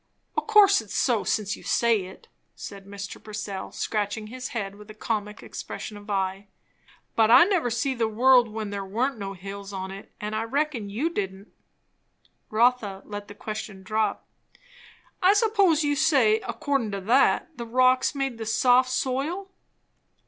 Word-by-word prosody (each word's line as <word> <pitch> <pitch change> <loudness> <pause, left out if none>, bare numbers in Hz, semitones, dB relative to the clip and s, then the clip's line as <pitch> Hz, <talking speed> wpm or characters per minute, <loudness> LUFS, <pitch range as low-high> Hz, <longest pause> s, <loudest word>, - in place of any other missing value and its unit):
"O' - - +2
course 415 - +5
it's 215 - -9
so, 235 -5 +2
since 210 -2 -1
you - - -14
say 230 -5 +2
it," 190 - -13 0.3
said 200 -1 -9
Mr. 200 0 -8
Purcell, 205 -2 -6
scratching 210 0 -2
his 255 +4 -6
head 200 -4 -4
with 210 +1 -14
a 215 - -10
comic 215 -1 -3
expression 215 - -7
of 205 +1 -12
eye; 195 0 -2 0.7
"but 220 -1 +4
I 240 - +9
never 360 -10 +1
see 245 +4 0
the 235 -3 0
world 245 +2 +5
when 215 -1 -5
there 200 -1 -3
warn't 235 +6 -1
no 195 -1 -4
hills 195 +1 -8
on 190 -1 -5
it; 195 +1 -10
and 210 +1 -4
I 215 - 0
reckon 255 -2 -1
you 265 +12 -1
didn't." 195 - -4 1.0
Rotha 220 -3 +1
let 205 -1 -7
the 205 - -11
question 215 -2 -6
drop. 215 +3 -1 1.0
"I 375 +2 +6
s'pose 405 -8 +3
you'd 290 -1 +1
say, 240 -8 +4
accordin' 275 -7 -1
to 200 - -3
that, 270 - +2
the 235 - -5
rocks 255 +3 +3
made 270 -4 -2
the 225 - -5
soft 250 +3 +4
soil?" 290 +10 -2
220 Hz, 165 wpm, -26 LUFS, 205-260 Hz, 1.0 s, I